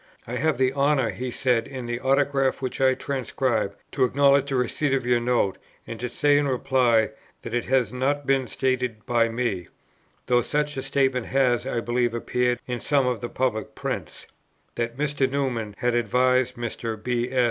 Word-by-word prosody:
"I 125 +2 -4
have 155 +1 +1
the 130 0 +2
honour," 140 -3 +2
he 125 +1 -5
says 120 -2 +1
in 130 -3 -6
the 120 0 -3
autograph 135 0 +1
which 130 0 -4
I 130 -1 +4
transcribe, 125 -7 -1 0.2
"to 135 - +1
acknowledge 140 +2 +3
the 135 - -1
receipt 130 +3 0
of 130 -2 -2
your 120 -1 +3
note, 120 -5 0 0.3
and 115 - -7
to 125 - -3
say 145 +3 +3
in 145 - 0
reply 125 -4 +2 0.3
that 115 - -7
it 120 - 0
has 130 -2 +1
not 140 +3 0
been 135 -2 +2
stated 125 -4 -1
by 115 -1 +2
me, 115 -7 -2 0.6
(though 120 -1 +3
such 150 +4 -1
a 135 - -3
statement 135 -3 0
has, 125 -2 +2
I 120 -3 -1
believe, 120 0 0
appeared 125 +1 0
in 125 -1 -3
some 140 0 +2
of 125 -2 0
the 120 - -4
Public 125 -5 -2
Prints,) - - -5 0.5
that 115 +1 -3
Mr. 145 -2 0
Newman 125 -7 -2
had 125 0 0
advised 125 +2 +2
Mr. 115 -1 -4
B. 125 0 -1
S. 130 - 0
125 Hz, 185 wpm, -25 LUFS, 120-135 Hz, 0.6 s, I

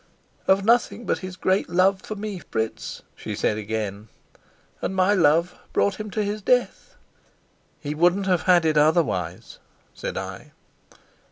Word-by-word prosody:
"Of 195 +1 +3
nothing 235 0 +2
but - - 0
his 185 -1 -7
great 185 +2 0
love 185 +2 +3
for 215 - -6
me, 205 -2 -5
Fritz," 110 -8 -4
she 105 - -6
said 105 +1 0
again. 105 -1 -4 0.7
"And 190 - -2
my 185 +2 +3
love 170 -1 +3 0.2
brought 200 0 +1
him 215 0 -5
to 215 +1 -1
his 205 +1 -3
death." 250 - 0 0.8
"He 145 -1 -4
wouldn't 175 +5 +2
have 180 -3 +2
had 175 -2 +6
it 155 -1 +3
otherwise," 150 - 0 0.3
said - - -5
I. - - -7
180 Hz, 150 wpm, -24 LUFS, 145-200 Hz, 0.8 s, had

